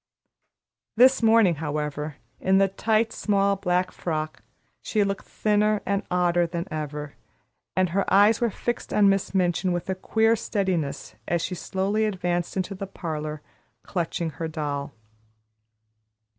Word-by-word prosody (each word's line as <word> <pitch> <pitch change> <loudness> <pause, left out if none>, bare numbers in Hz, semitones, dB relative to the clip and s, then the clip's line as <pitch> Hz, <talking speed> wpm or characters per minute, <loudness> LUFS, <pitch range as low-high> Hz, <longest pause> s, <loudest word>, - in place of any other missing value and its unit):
This 255 +3 +6
morning, 220 -7 +5
however, 150 -1 -3 0.2
in 190 +1 +3
the 195 0 +5
tight, 220 +3 +1
small 200 -1 +2
black 180 -1 0
frock, 155 -2 -4 0.4
she 215 -2 +1
looked 195 -1 -3
thinner 210 0 +1
and 200 0 0
odder 175 -1 +2
than 170 +1 -4
ever, 150 -1 -5 0.6
and 185 -1 +2
her 195 +3 -1
eyes 205 +4 +5
were 235 - +3
fixed 240 +3 -4
on 205 -1 +6
Miss 195 0 0
Minchin 180 0 +1
with 175 -1 -2
a - - +1
queer 220 +4 +2
steadiness 175 - -2
as 170 -1 0
she 180 - -3
slowly 195 +4 -1
advanced 175 -3 -2
into 190 +1 -2
the 195 0 -6
parlor, 155 -5 -5 0.4
clutching 170 -2 -2
her 165 +1 -4
doll. 145 -2 -3
185 Hz, 140 wpm, -25 LUFS, 160-200 Hz, 0.6 s, This